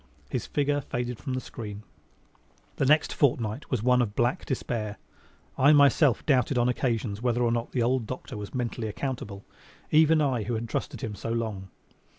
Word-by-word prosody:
His - - -2
figure 145 0 0
faded 120 -2 -4
from 130 -3 -3
the - - -1
screen. 105 -4 -8 0.9
The 135 - +1
next 150 +2 +4
fortnight 120 -2 0
was 120 -5 -1
one 125 0 +4
of 105 -4 -2
black 120 +10 0
despair. 110 -5 -3 0.6
I 145 +3 +7
myself 140 -3 +4
doubted 130 -2 +2
on 120 0 +3
occasions 115 -4 -1
whether 120 0 +1
or 120 - +2
not 115 0 -2
the 125 - +1
old 125 -1 +1
doctor 130 +1 -6
was 105 -1 -6
mentally 120 -2 -2
accountable 105 -4 -5 0.5
even 160 +1 +5
I 135 -6 +1
who 115 +3 -2
had 115 +1 -3
trusted - - -4
him 110 - -4
so 110 - -6
long. 110 -5 -3
120 Hz, 175 wpm, -27 LUFS, 110-135 Hz, 0.9 s, I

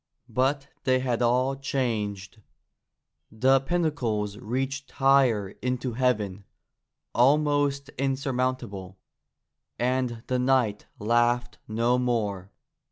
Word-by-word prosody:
But 135 +2 0 0.2
they 130 0 +3
had 125 -2 -1
all 125 +3 +2
changed. 110 -7 -3 0.9
The 130 +5 +4
pinnacles 130 - -1
reached 135 +4 -3
higher 135 -7 +3
into 125 -1 -2
heaven, 105 -6 0 0.7
almost 145 +1 +2
insurmountable, 130 -8 -2 0.8
and 125 -2 -1
the 125 -1 0
knight 125 -5 +1
laughed 120 +2 +1
no 115 +3 +1
more. 105 -6 -1
125 Hz, 90 wpm, -26 LUFS, 110-135 Hz, 0.9 s, The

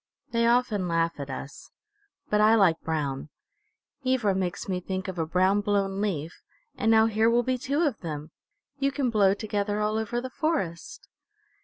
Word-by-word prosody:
They 230 0 +2
often 235 -6 +2
laugh 165 -1 0
at 140 0 -5
us. 135 +1 -8 0.6
But 210 0 +2
I 215 +1 +6
like 185 -7 +3
brown. 150 -3 -3 0.7
Ivra 255 -6 +2
makes 185 0 -3
me 185 -2 -1
think 185 +1 -4
of 185 -2 -5
a 160 - -1
brown, 185 +4 +2
blown 200 -1 0
leaf, 170 -6 -3 0.3
and 225 - 0
now 220 0 +6
here 220 0 +2
will 240 +1 +3
be 255 +1 -1
two 285 +5 0
of 280 -9 0
them! 155 -2 -6 0.5
You 275 0 +1
can 270 -3 -1
blow 200 -3 +4
together 205 0 -2
all 215 +1 0
over 220 +2 -2
the 255 +1 -6
forest." 245 - -3
205 Hz, 175 wpm, -27 LUFS, 175-230 Hz, 0.7 s, I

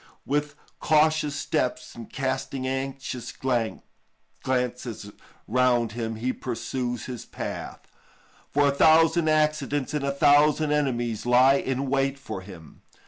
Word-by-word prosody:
With 145 +1 -1 0.2
cautious 155 -1 +2
steps - - -2
and 115 -2 -10
casting 135 0 -3
anxious 135 -2 -4
glances 125 -1 -4 0.4
round 120 -1 +2
him 115 0 -4
he 125 +4 -2
pursues 125 -1 -4
his 125 -3 -6
path, - - -6 0.7
for 145 0 +3
a - - 0
thousand 160 +2 +4
accidents 150 -2 +1
and 150 -2 -1
a 140 - 0
thousand 145 +2 +4
enemies 120 -6 -1
lie 125 +2 +6
in 135 0 -1
wait 135 +1 0
for 110 -8 -7
him. 90 -5 -13
135 Hz, 120 wpm, -25 LUFS, 120-145 Hz, 0.7 s, lie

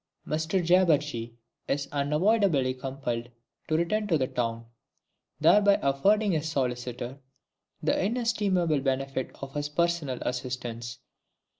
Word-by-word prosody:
XXVII - - -1
_Mr 160 +3 0
Jabberjee 150 -10 +2 0.3
is 140 0 -1
unavoidably 150 - +2
compelled 130 -3 -4 0.4
to 155 - +1
return 210 +6 0
to 160 -8 +2
town, 115 -2 -3 0.7
thereby 205 -1 +5
affording 195 +10 +2
his 160 -2 -1
Solicitor 125 -2 -3 0.6
the - - +1
inestimable 200 - +1
benefit 135 -1 -1
of 135 0 -6
his 145 -1 -2
personal 165 -4 0
assistance. 120 -1 -4
145 Hz, 110 wpm, -28 LUFS, 130-175 Hz, 0.7 s, thereby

